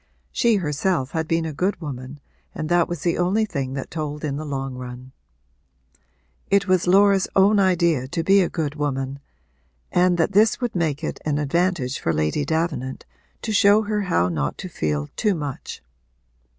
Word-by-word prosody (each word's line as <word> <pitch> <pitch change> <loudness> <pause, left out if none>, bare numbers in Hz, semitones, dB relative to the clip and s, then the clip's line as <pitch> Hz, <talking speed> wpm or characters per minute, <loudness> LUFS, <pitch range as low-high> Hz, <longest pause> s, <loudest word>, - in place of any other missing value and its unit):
She 235 -2 +3
herself 160 -4 -1
had 160 -1 -2
been 165 0 0
a 160 - -4
good 185 +7 -1
woman 140 -2 -7 0.4
and 155 - -4
that 175 -1 +3
was 175 -4 -4
the 170 -1 0
only 195 +5 +2
thing 140 -9 -4
that 135 -1 -5
told 150 -2 -4
in 145 -2 -2
the 150 - -4
long 135 -2 -4
run. 125 0 -8 1.4
It 200 0 +3
was 185 -1 +2
Laura's 195 +1 +5
own 200 +2 +5
idea 170 -8 +2
to 165 +5 -2
be 195 +3 +5
a 180 - +1
good 155 -4 -2
woman 140 -2 -3 0.7
and 180 0 +3
that 165 +4 +1
this 210 +2 +4
would 245 -5 -3
make 160 -3 -1
it - - -3
an 150 -2 0
advantage 150 -2 0
for 80 - 0
Lady 75 - 0
Davenant 145 -4 -2 0.4
to 220 - -2
show 205 +1 +5
her 210 0 -1
how 130 - +1
not 75 -5 -2
to 185 - -7
feel 75 - -2
too 210 -3 +1
much. 145 -4 -6
160 Hz, 175 wpm, -23 LUFS, 135-185 Hz, 1.4 s, Laura's